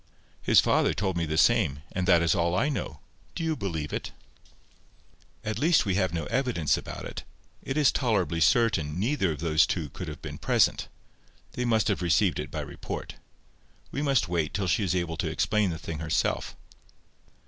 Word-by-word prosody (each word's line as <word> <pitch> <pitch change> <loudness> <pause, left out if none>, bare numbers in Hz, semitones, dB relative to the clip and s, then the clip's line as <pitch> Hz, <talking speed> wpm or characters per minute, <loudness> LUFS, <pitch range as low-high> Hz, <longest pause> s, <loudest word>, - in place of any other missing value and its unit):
"His - - +5
father - - +2
told 95 -2 -1
me 85 -1 -1
the 80 0 -2
same; 85 - +3
and 90 -1 -2
that 85 -3 +5
is 85 - +3
all 85 -2 +1
I 135 +10 +2
know. 100 - -4 0.3
Do - - -3
you 160 -1 0
believe 80 - -4
it?" - - -4 1.3
"At 110 0 -3
least 160 -1 +4
we 95 - 0
have 95 -2 +1
no 85 -1 -2
evidence 120 - +1
about - - -7
it. - - -7 0.4
It 135 - -4
is 150 -2 +5
tolerably 95 - 0
certain 85 -5 +2
neither 110 - +1
of 75 - -6
those 80 -1 +3
two 80 -5 -2
could 90 +5 -7
have 75 -2 -7
been - - -7
present. - - +2 0.6
They 125 - -3
must 110 -2 +2
have 100 -4 0
received 90 +2 +2
it - - -4
by - - -4
report. - - -7 0.7
We 140 - -3
must 135 -8 +2
wait 85 -3 -1
till 100 -2 -1
she 105 - +1
is 90 -2 0
able 85 -3 -2
to - - -1
explain 105 -2 +1
the 80 - -4
thing 80 -1 -6
herself." 80 -1 -1
90 Hz, 190 wpm, -27 LUFS, 80-110 Hz, 1.3 s, His